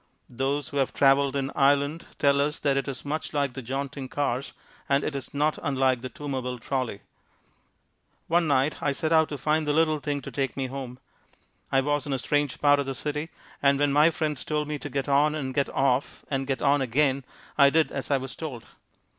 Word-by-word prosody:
Those 135 +3 -1
who 145 - -5
have 135 -2 0
traveled 140 0 +4
in 135 0 -1
Ireland 145 +3 +2
tell 140 -1 +3
us 150 +1 0
that 140 -2 +1
it 135 - -1
is 135 0 -6
much 155 +2 -3
like 140 -3 0
the 130 - -6
jaunting 135 +2 -4
cars, 140 -2 -2 0.4
and 140 0 +3
it 145 - -3
is 135 - -5
not 150 +2 0
unlike 130 -3 +1
the 130 - -5
Toomerville 130 -4 -4
Trolley. 125 -4 -3 1.2
One 170 0 +2
night 140 +1 +1
I 140 - +1
set 155 +3 -2
out 160 -1 +4
to 145 - -4
find 155 +2 0
the 145 - +2
little 155 -1 +2
thing 145 0 -2
to - - -7
take 135 -1 -2
me 135 - -1
home. 130 -1 -6 0.7
I 135 - +4
was 145 +1 -1
in 140 - -1
a - - +1
strange 145 +1 0
part 145 -1 +5
of 140 - -2
the 135 - -3
city 150 +3 -3 0.3
and 140 0 +4
when 145 0 +2
my 150 +3 +6
friends 155 -4 -2
told 150 -1 -1
me 150 -1 -3
to 145 - -6
get 135 0 -2
on 145 +2 +3
and 135 -4 -3
get 140 +1 +1
off 135 0 0
and 135 -1 -1
get 135 -1 -2
on 145 0 +4
again 135 +2 +1 0.3
I 140 - +7
did 155 -1 +2
as 135 - -5
I 140 - +3
was 130 0 -6
told. 140 -8 -6
140 Hz, 215 wpm, -26 LUFS, 135-145 Hz, 1.2 s, I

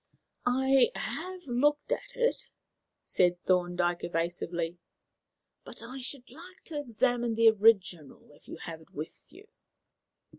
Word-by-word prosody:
"I 265 - +4
have 370 0 -5
looked 290 +4 +1
at - - -3
it," - - 0 0.5
said 180 -1 +2
Thorndyke 175 -1 +1
evasively, 170 0 -2 0.8
"but - - -11
I 255 +3 -7
should 255 0 -6
like 345 +8 -14
to 300 -2 -5
examine 240 -2 0
the 225 0 +7
original 195 -10 +2
if 145 - -21
you - - -8
have 165 -1 -8
it 160 - -19
with 155 +2 -7
you." 395 +4 -16
230 Hz, 125 wpm, -30 LUFS, 175-270 Hz, 0.8 s, the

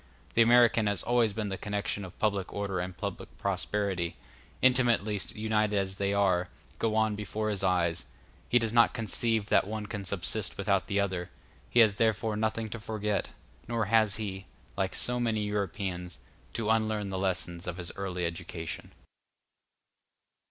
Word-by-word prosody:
The 115 - +5
American 115 -2 +5
has 100 -3 0
always 120 -4 +2
seen 110 -2 -2
the 95 - -4
connection 100 0 -2
of 95 0 -10
public 100 -3 0
order 100 -2 -2
and 90 0 -4
public - - -6
prosperity, 95 -5 -1 0.4
intimately 120 -5 +3
united 105 -1 +1
as 95 -1 -1
they 100 0 0
are, 95 -3 +2 0.3
go 110 -1 +1
on 110 -1 +2
before 105 +1 -3
his 100 - -2
eyes; 85 -3 +1 0.4
he 120 - +5
does 115 -2 0
not 115 0 +5
conceive 110 -1 +1
that - - +4
one 110 0 -4
can 105 -1 -5
subsist 95 +1 -1
without 100 -1 +1
the 100 -1 +1
other; 95 -3 -1 0.4
he 120 - +5
has 105 -3 +5
therefore 110 -1 +1
nothing 110 +1 -1
to 115 - -5
forget; 105 -1 -2 0.4
nor 115 -2 0
has 110 -1 +3
he, 95 -3 -5 0.3
like 95 -1 -1
so 125 0 +2
many 115 -3 +1
Europeans, 95 -3 -3 0.4
to 110 -1 0
unlearn 110 -2 0
the 95 - -2
lessons 90 -2 -2
of 90 0 -4
his 85 -2 -4
early 90 -3 -2
education. 85 -1 -5
105 Hz, 160 wpm, -30 LUFS, 95-110 Hz, 0.4 s, The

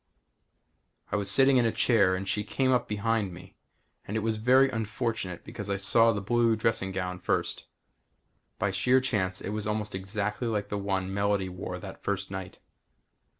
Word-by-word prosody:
I - - +1
was 100 -1 0
sitting 135 +5 +5
in 120 - +4
a - - +1
chair 100 -7 +3
and 95 +1 -4
she 105 +2 0
came 130 +5 0
up 125 -1 +2
behind 105 -1 0
me 90 - -13 0.5
and 105 - -2
it - - 0
was 110 0 0
very 130 +5 +5
unfortunate 110 -5 -3
because 105 -1 -7
I 100 - 0
saw 115 +4 +4
the 105 - -2
blue 115 +3 +2
dressing 110 -3 0
gown 90 -1 -3
first. - - -1 0.9
By 100 0 0
sheer 125 +7 +3
chance 95 -8 -1
it - - -4
was 105 0 -3
almost 105 0 -2
exactly 105 +4 -2
like 105 -2 -1
the 105 - -2
one 95 -1 -2
Melody 100 -1 +1
wore 90 - -5
that - - -9
first - - -2
night. - - -6
105 Hz, 180 wpm, -28 LUFS, 95-115 Hz, 0.9 s, sitting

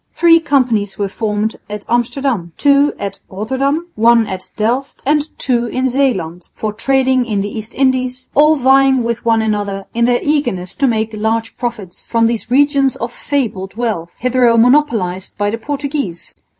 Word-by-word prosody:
Three 335 -1 +5
companies 250 -10 0
were 200 - -1
formed 210 +1 -2
at 210 0 -6
Amsterdam, 240 - -1
two 285 0 +3
at 200 - -5
Rotterdam, 265 - -1
one 230 +1 +4
at 190 -2 -6
Delft 245 +6 -2
and 295 +2 +1
two 240 -2 0
in 260 +2 -1
Zeeland, 190 -11 -1
for 215 -1 -3
trading 260 +2 +2
in 210 -4 -1
the 205 +3 -5
East 220 +1 -7
Indies, 255 -1 0
all 300 +2 +5
vying 270 -1 +4
with 235 0 -3
one 225 -1 +2
another 205 -2 -2
in 235 0 +2
their 245 0 +2
eagerness 240 -12 -1
to 280 -1 +2
make 220 -2 -1
large 225 +1 -2
profits 220 -7 -6
from 230 -1 +2
these 230 0 -1
regions 275 0 +3
of 235 +1 -5
fabled 210 -10 -3
wealth, 215 -8 -2
hitherto 250 -1 +2
monopolised 225 -8 +2
by 205 0 0
the 230 - -4
Portuguese. 280 - -4
235 Hz, 165 wpm, -16 LUFS, 210-270 Hz, -, Three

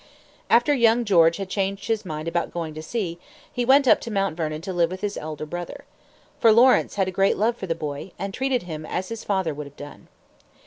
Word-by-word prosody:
After 240 +5 +4
young 235 -2 +3
George 170 -5 +5
Washington - - -6
had 190 - -10
changed 195 0 -2
his 225 -3 -1
mind 155 -1 -5
about 170 +1 -1
going 165 -2 -4
to 155 - -7
sea, 175 -1 -4 0.3
he 245 - -1
went 270 +2 +5
up - - +5
to - - -6
Mount 195 -5 -1
Vernon 155 -2 -3
to 190 +2 -5
live 170 -2 +2
with 185 +1 -7
his 205 -1 -2
elder 155 0 -6
brother. 175 +3 -7 0.6
For 225 - +6
Lawrence 245 +4 +4
had 190 -2 0
great 195 +2 +2
love 225 +3 +1
for 190 - -7
the 165 - -1
boy, 150 +2 -6
and 195 0 -5
treated 260 -1 0
him 155 -3 -6
as 180 +4 -4
his 230 -1 -6
father 190 -6 -1
would 145 0 -7
have 140 - -17
done. 145 0 -11
190 Hz, 230 wpm, -24 LUFS, 165-225 Hz, 0.6 s, For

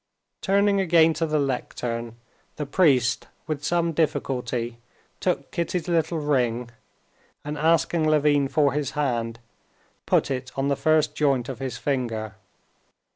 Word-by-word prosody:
Turning 200 0 +3
again 165 -3 +4
to 165 +1 -1
the 155 0 0
lectern, 120 -4 -3 0.4
the 150 - -4
priest 140 -6 +2 0.2
with 155 -2 -4
some 170 +1 +1
difficulty 125 -6 -1 0.4
took 180 - -1
Kitty's 170 0 -2
little 165 -1 +1
ring, 125 -5 0 0.7
and 150 0 -3
asking 160 +1 +2
Levin 145 -2 +3
for 140 +1 +2
his 145 -2 -2
hand, 120 -5 -1 0.7
put - - +2
it 130 0 -3
on 135 +1 0
the 140 - +2
first 155 +1 +2
joint 135 -5 +1
of 130 - -6
his 130 -3 -4
finger. 115 -6 -2
145 Hz, 130 wpm, -25 LUFS, 125-160 Hz, 0.7 s, again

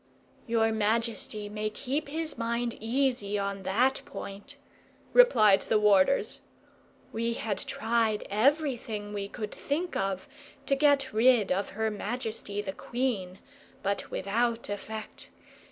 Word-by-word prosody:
"Your 225 -1 +2
majesty 220 -1 -1
may 210 +1 -3
keep 275 +7 -3
his 315 +1 -3
mind 235 0 -1
easy 230 -3 0
on 200 -1 -2
that 235 +8 +2
point," 205 +9 -8 0.6
replied 215 - +6
the 220 - +1
warders. 210 +4 +3 0.7
"We 230 +1 0
had 215 -4 -2
tried 225 -1 0
everything 225 -3 0
we 200 -1 -3
could 210 +1 -6
think 330 +5 -3
of 195 -1 -2 0.4
to 275 - +2
get 275 -2 +3
rid 225 -1 +4
of 190 +2 0
her 220 0 +1
majesty 215 -1 -4
the 190 -2 -4
queen, 220 -8 -2 0.5
but 200 0 -1
without 230 +4 -1
effect. 215 +1 -6
220 Hz, 120 wpm, -29 LUFS, 205-250 Hz, 0.7 s, replied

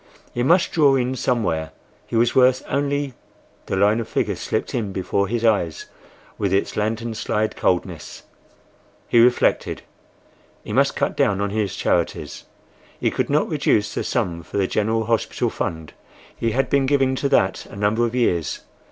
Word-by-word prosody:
He 120 - -2
must 170 +8 +3
draw 145 -4 +4
in 130 0 0
somewhere: 105 -11 -1 0.3
he - - -5
was 115 +1 +3
worth 130 0 +4
only—the 140 -7 -4
line 105 +3 +3
of 115 - -4
figures - - -1
slipped - - -2
in 110 -5 -2
before 95 +1 -1
his 115 +2 -1
eyes 100 -8 +1 0.5
with 100 -2 0
its 100 +1 0
lantern 110 +2 -2
slide 110 0 -1
coldness. 90 -3 -2 0.8
He 120 - +4
reflected. 120 +1 +2 0.8
He - - -6
must - - +2
cut - - -1
down 100 -1 +2
on 100 0 -1
his 105 -3 -1
charities. - - -1 0.5
He - - +1
could - - -1
not - - +2
reduce 105 -1 +1
the - - -2
sum 90 -9 -1
for 85 - -7
the 100 - +2
General 110 +3 0
Hospital 115 0 0
Fund; 80 -1 -4 0.4
he 115 - -1
had 135 +4 0
been 140 -1 +2
giving 135 -1 +2
to 140 - 0
that 95 -6 +1
a - - -12
number 105 +3 +1
of 120 +1 -1
years. 90 -10 0
110 Hz, 165 wpm, -22 LUFS, 100-125 Hz, 0.8 s, draw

